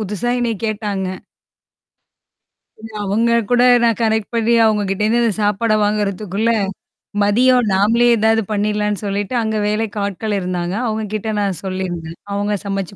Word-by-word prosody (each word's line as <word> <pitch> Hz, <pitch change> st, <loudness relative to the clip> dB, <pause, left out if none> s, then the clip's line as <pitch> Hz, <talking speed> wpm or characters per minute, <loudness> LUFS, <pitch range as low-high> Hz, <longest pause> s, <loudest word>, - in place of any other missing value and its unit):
புதுசா 210 Hz, +3 st, -2 dB
என்னைய 235 Hz, -3 st, -1 dB
கேட்டாங்க. 205 Hz, -3 st, -2 dB, 2.0 s
அவங்க 215 Hz, +4 st, +1 dB, 0.2 s
கூட 245 Hz, 0 st, +4 dB, 0.2 s
நான் 230 Hz, -1 st, +2 dB
கனெக்ட் 220 Hz, -1 st, +1 dB
பண்ணி 230 Hz, 0 st, +1 dB
நான் 225 Hz, -, +5 dB
அவங்க 210 Hz, -1 st, +1 dB
கிட்ட 195 Hz, +1 st, -1 dB
இருந்து, 235 Hz, +2 st, +2 dB
இந்த 230 Hz, -, +2 dB
சாப்பாட 210 Hz, +2 st, +1 dB
வாங்குறதுக்குள்ள, 205 Hz, +1 st, -1 dB, 0.7 s
மதியம் 245 Hz, +3 st, +3 dB
நாமளே 225 Hz, +5 st, +3 dB
ஏதாவது 220 Hz, +1 st, +2 dB
பண்ணிறலாம்ன்னு 210 Hz, 0 st, -1 dB
சொல்லிட்டு, 205 Hz, +4 st, -2 dB
அங்க 220 Hz, 0 st, -2 dB
வேலைக்கு 210 Hz, 0 st, -2 dB
ஆட்கள் 205 Hz, +1 st, -2 dB
இருந்தாங்க. 180 Hz, 0 st, -3 dB
அவுங்க 220 Hz, 0 st, -2 dB
கிட்ட 220 Hz, +1 st, -3 dB
நான் 195 Hz, -5 st, -2 dB
சொல்லியிருந்தேன். 175 Hz, -3 st, -5 dB
அவுங்க 205 Hz, +1 st, -1 dB
சமைச்சு 195 Hz, -1 st, -3 dB
210 Hz, 140 wpm, -18 LUFS, 200-225 Hz, 2.0 s, நான்